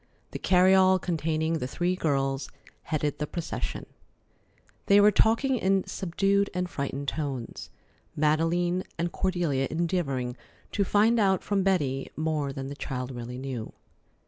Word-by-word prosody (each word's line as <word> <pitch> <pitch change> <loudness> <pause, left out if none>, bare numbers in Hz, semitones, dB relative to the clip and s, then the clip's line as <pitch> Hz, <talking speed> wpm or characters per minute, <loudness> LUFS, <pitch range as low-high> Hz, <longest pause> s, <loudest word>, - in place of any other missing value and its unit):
The - - -5
carryall 185 0 +5
containing 160 -1 -1
the 125 - -3
three 175 +6 -1
girls 135 -4 -1 0.4
headed 150 -2 -1
the 150 - -2
procession. 170 0 -4 1.0
They 200 0 +7
were 205 +1 +7
talking 230 +6 +3
in 195 -2 +2
subdued 195 +2 0
and 180 0 -1
frightened 140 -3 -4
tones, 135 -6 -4 0.5
Madeleine 165 +4 +1
and 170 +1 -1
Cordelia 170 -8 0
endeavoring 155 -7 -1 0.4
to 200 - +1
find 215 +4 +3
out 190 -3 +2
from 200 -1 0
Betty 150 -9 0
more 155 -3 -1
than 135 -1 -5
the 140 +1 -6
child 130 -2 -4
really 120 0 -6
knew. 130 -4 -5
165 Hz, 135 wpm, -27 LUFS, 140-190 Hz, 1.0 s, They